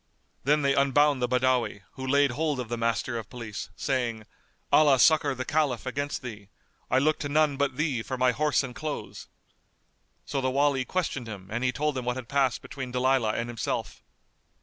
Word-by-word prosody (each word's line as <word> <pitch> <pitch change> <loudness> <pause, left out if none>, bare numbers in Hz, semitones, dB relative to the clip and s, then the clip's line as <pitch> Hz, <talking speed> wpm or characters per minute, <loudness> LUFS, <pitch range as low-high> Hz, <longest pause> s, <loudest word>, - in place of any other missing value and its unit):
Then 150 +1 +3
they 140 0 +3
unbound 140 0 +3
the 125 - +2
Badawi, 125 -4 +1
who 130 -1 -7
laid 140 0 +3
hold 150 +1 -1
of 120 -3 -4
the 120 - -1
Master 115 +1 -1
of 110 - -9
Police, 115 -5 -7
saying, 120 -5 -2 0.5
"Allah 145 -3 +6
succour 150 -1 +4
the 130 0 -4
Caliph 145 -6 0
against 140 +2 -3
thee! 105 -5 -8 0.4
I 130 - +3
look 155 +3 +2
to 145 - -3
none 150 -1 +3
but 140 -2 -1
thee 145 -6 0
for 130 +5 -4
my 125 0 +3
horse 150 +3 +1
and 125 -2 -6
clothes!" 155 +3 -6 1.0
So 135 - -2
the 130 - +1
Wali 135 -1 +2
questioned 145 -9 -2
him 95 -4 -8
and 120 +3 -2
he 125 - +2
told 150 +3 -1
him 130 -2 -3
what 125 0 0
had 130 -2 -6
passed 135 -3 +1
between 130 -3 -6
Dalilah 125 -3 +2
and 115 - -2
himself. 120 -3 -4
130 Hz, 195 wpm, -27 LUFS, 120-145 Hz, 1.0 s, Allah